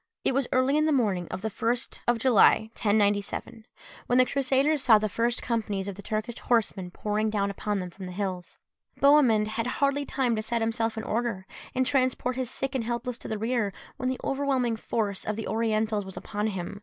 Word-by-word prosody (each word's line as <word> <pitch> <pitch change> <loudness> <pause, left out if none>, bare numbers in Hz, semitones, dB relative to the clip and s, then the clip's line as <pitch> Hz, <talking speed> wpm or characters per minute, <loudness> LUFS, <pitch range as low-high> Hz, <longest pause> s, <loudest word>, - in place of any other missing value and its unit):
It - - +2
was 270 -1 +1
early 255 +3 +3
in 305 +1 +3
the - - +2
morning 205 - +1
of 185 +2 -6
the 220 - 0
1st 235 +4 -2
of 240 0 +3
July 225 -2 +4
1097, 205 +1 0 0.4
when 245 - +3
the 255 - +6
Crusaders 275 +3 +2
saw 230 -4 +6
the 215 0 0
first 235 +3 -1
companies 210 -5 -2
of 200 - -3
the 200 - -10
Turkish 215 +3 -3
horsemen 210 -6 0
pouring 210 +3 -1
down 200 -2 0
upon 205 +1 -2
them 180 -1 -5
from 190 +1 -9
the 180 - -6
hills. 185 -2 -4 0.4
Bohemund 275 -7 +5
had 225 +2 -2
hardly 280 +2 +1
time 260 -4 0
to 215 - -1
set 230 +2 -1
himself 225 0 -1
in 220 - -3
order, 220 -5 -2 0.3
and 260 0 +2
transport 255 -1 +1
his 255 -2 -2
sick 270 +1 -2
and 260 -3 -1
helpless 240 +1 -3
to - - -8
the 220 - -2
rear, 225 -2 -1 0.2
when 255 - -1
the 260 - -3
overwhelming 270 -4 0
force 210 -3 -2
of 215 - -2
the 220 - -5
Orientals 220 -1 0
was 190 -1 -10
upon 210 +1 -3
him. 190 -1 -5
225 Hz, 205 wpm, -27 LUFS, 210-255 Hz, 0.4 s, the